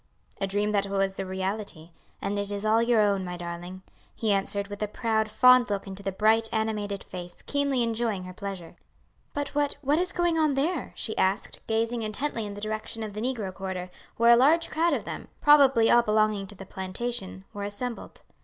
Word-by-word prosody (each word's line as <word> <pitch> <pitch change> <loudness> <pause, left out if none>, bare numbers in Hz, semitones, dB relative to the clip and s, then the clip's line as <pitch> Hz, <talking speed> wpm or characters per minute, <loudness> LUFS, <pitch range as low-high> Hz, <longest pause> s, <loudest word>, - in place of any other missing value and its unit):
"A 195 - 0
dream 205 +2 0
that 200 -1 +1
was 195 -1 -1
a 195 - -3
reality. 190 -3 -4 0.3
And 205 +1 -1
it 200 0 -2
is 205 +1 -3
all 220 +1 +4
your 235 -2 +3
own, 200 -2 +2
my 180 -1 -5
darling," 175 +2 -7 0.3
he 220 -2 0
answered 200 0 0
with 205 0 -8
a 210 - 0
proud, 220 0 0
fond 250 +2 +6
look 200 -1 -2
into 195 0 -8
the 195 0 -2
bright 220 +3 +3
animated 215 -3 -2
face, 175 -1 -9
keenly 280 -3 +1
enjoying 225 -4 -1
her 185 0 -8
pleasure. 195 -3 -7 0.6
"But 290 -1 -2
what, 290 -1 +1
what 290 +4 +2
is 365 +1 0
going 345 -2 +1
on 305 -3 +2
there?" 300 +1 -1
she 220 - -2
asked, 190 +2 0
gazing 230 +1 0
intently 225 +1 -2
in 200 - -7
the 205 - -8
direction 215 +1 -4
of 215 -2 -6
the 210 - -5
negro 225 -6 -2
quarter, 185 -1 -5 0.3
where 235 +1 +6
a - - +8
large 305 +7 +4
crowd 335 +2 +2
of - - -2
them, - - -6
probably 275 -6 +6
all 240 - +7
belonging 215 -2 +1
to 205 - -8
the 195 - -10
plantation, 190 +1 -3
were 205 - -6
assembled. 225 +4 -5
215 Hz, 200 wpm, -27 LUFS, 195-240 Hz, 0.6 s, a